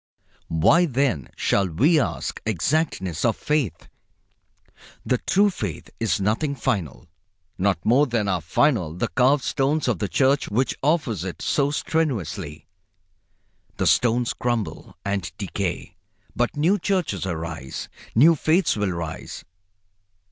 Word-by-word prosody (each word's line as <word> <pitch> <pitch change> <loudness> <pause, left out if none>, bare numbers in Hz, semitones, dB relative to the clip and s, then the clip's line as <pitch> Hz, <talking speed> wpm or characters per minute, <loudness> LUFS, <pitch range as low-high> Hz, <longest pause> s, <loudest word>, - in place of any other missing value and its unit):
Why, 155 - +4
then, 130 - 0
shall 100 -1 +1
we 145 - +3
ask 130 - -3
exactness 95 - -1
of 115 - +2
faith? 150 - -1 1.2
The 125 - +1
true 200 +1 +3
faith 100 - -6
is 115 -2 0
nothing 115 +9 0
final, 105 - -2 0.5
not 95 -3 0
more 135 +6 +4
than 115 -4 0
are 95 -3 0
final 85 - +1
the 90 - -2
carved 130 - +3
stones 145 +2 0
of 115 -8 0
the 105 - -1
church 135 +6 +2
which 125 +6 +1
offers 135 - 0
it 95 -2 -6
so 140 -1 +1
strenuously. 100 - -2 1.1
The - - 0
stones 120 0 +2
crumble 115 -9 -3
and 100 -4 -2
decay, 95 -2 -4 0.4
but 120 +4 0
new 180 +8 +3
churches 175 - -1
rise. 80 -6 -5 0.3
New 155 +9 +7
faiths 160 +4 +2
will 105 -3 -1
rise. 80 -2 -6
115 Hz, 125 wpm, -23 LUFS, 90-145 Hz, 1.2 s, New